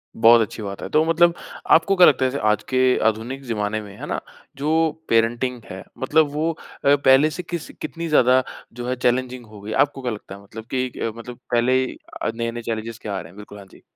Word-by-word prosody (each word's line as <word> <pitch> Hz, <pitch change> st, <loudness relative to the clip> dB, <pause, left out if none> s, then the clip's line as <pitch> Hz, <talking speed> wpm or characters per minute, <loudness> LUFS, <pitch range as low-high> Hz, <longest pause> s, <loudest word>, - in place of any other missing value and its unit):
बहुत 115 Hz, +1 st, +6 dB
अच्छी 110 Hz, 0 st, -4 dB
बात 100 Hz, -1 st, -6 dB
है। -, -, -5 dB
तो 155 Hz, +1 st, +3 dB
मतलब 170 Hz, +1 st, +4 dB, 0.4 s
आपको 175 Hz, +5 st, +5 dB
क्या 180 Hz, -1 st, +8 dB
लगता 130 Hz, -2 st, +3 dB
है 130 Hz, -, +1 dB
जैसे 140 Hz, -, -4 dB
आज 105 Hz, 0 st, +2 dB
के 130 Hz, 0 st, +3 dB
आधुनिक 120 Hz, +5 st, -2 dB
ज़माने 110 Hz, -1 st, -2 dB
में, 100 Hz, -2 st, -11 dB
है -, -, -7 dB
ना? -, -, -2 dB, 0.4 s
जो 160 Hz, +2 st, +1 dB, 0.2 s
पेरेंटिंग 120 Hz, +2 st, +1 dB
है 95 Hz, +1 st, -8 dB
मतलब 150 Hz, +3 st, +2 dB
वो 160 Hz, +3 st, 0 dB, 0.3 s
अ, 140 Hz, +1 st, +6 dB
पहले 140 Hz, +2 st, +5 dB
से 180 Hz, +3 st, -6 dB
किस 170 Hz, -1 st, -6 dB
कितनी 170 Hz, 0 st, -5 dB
ज़्यादा 130 Hz, -3 st, +4 dB, 0.3 s
जो 120 Hz, +1 st, -6 dB
है 130 Hz, -, 0 dB
चैलेंजिंग 125 Hz, 0 st, -1 dB
हो 105 Hz, -1 st, -13 dB
गई। 105 Hz, +2 st, -7 dB
आपको 140 Hz, -1 st, -11 dB
क्या 125 Hz, -, -2 dB
लगता 105 Hz, -2 st, -8 dB
है 100 Hz, -, -13 dB
मतलब 110 Hz, +3 st, -10 dB
कि 125 Hz, -3 st, -2 dB
मतलब 120 Hz, +1 st, -9 dB
पहले 125 Hz, +2 st, +3 dB, 0.4 s
आ -, -, +1 dB
नए-नए 115 Hz, 0 st, -3 dB
चैलेंजस 115 Hz, 0 st, -5 dB
क्या 100 Hz, -2 st, -4 dB
आ -, -, -2 dB
रहे 80 Hz, -, -12 dB
हैं? 90 Hz, -, -18 dB
बिल्कुल, 105 Hz, 0 st, -11 dB
हाँ 100 Hz, -, -12 dB
जी। -, -, -18 dB
125 Hz, 225 wpm, -22 LUFS, 110-140 Hz, 0.4 s, क्या